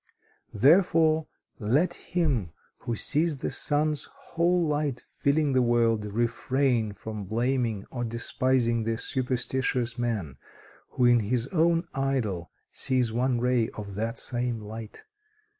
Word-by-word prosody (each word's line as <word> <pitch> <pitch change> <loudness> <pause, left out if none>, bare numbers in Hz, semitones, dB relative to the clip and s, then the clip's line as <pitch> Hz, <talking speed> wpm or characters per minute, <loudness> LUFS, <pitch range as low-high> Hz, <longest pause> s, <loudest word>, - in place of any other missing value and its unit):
"Therefore, 160 - +4 0.3
let 130 +12 +2
him 140 - -1 0.3
who 120 - -3
sees 150 +6 +1
the - - -3
sun's 150 0 0
whole 175 +1 0
light 145 -4 -1
filling 140 0 0
the 130 - +4
world, 115 -3 +2
refrain 120 +1 0
from 105 +1 -7
blaming 115 -1 -1
or 120 -2 -3
despising 115 0 +1
the 115 0 -1
superstitious 125 -1 -1
man, 105 - -2 0.5
who 125 - +1
in 120 0 +6
his 115 +4 -1
own 170 0 +2
idol 120 -11 -1 0.2
sees 130 -4 0
one 125 +1 +1
ray 125 -2 +2
of 100 -1 -7
that 115 +4 -3
same 120 -1 -2
light. 110 +1 -9
125 Hz, 125 wpm, -27 LUFS, 115-140 Hz, 0.5 s, in